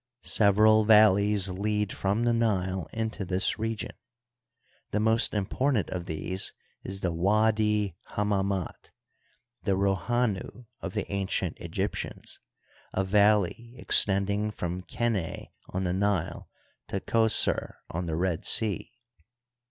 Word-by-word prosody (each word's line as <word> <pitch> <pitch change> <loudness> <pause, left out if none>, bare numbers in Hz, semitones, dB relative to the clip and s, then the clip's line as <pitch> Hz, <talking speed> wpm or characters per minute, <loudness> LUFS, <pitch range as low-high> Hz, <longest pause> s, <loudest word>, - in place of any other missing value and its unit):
Sev 100 -3 +3
eral 110 +1 +5
valleys 105 -2 +5
lead 105 +2 -1
from 100 +4 0
the 120 0 +2
Nile 95 -7 0
into 110 -2 -3
this 95 +3 -1
region. 110 0 -3 1.0
The 105 - -1
most 110 +1 +2
important 110 +2 0
of 90 -1 -4
these 95 +5 -3 0.3
is 95 +1 -5
the 85 -2 -1
Widi 105 +2 +2 0.2
Hammam^t, 100 -3 -1 0.7
the 100 - 0
Rohanu 100 +4 -1
of - - -6
the - - -1
ancient 100 -1 -2
Egyptians, - - -4 0.5
a 95 - +1
valley 105 +4 +2
extending 100 0 +3
from 90 -3 -4
Qeneh 100 -1 -3 0.2
on 95 - -3
the 90 -1 0
Nile 95 -3 -1 0.4
to - - -2
Qos^r, 110 -1 +2 0.2
on 85 +1 -3
the 80 - -2
Red 85 -1 -1
Sea. 110 -2 +1
100 Hz, 120 wpm, -28 LUFS, 95-110 Hz, 1.0 s, eral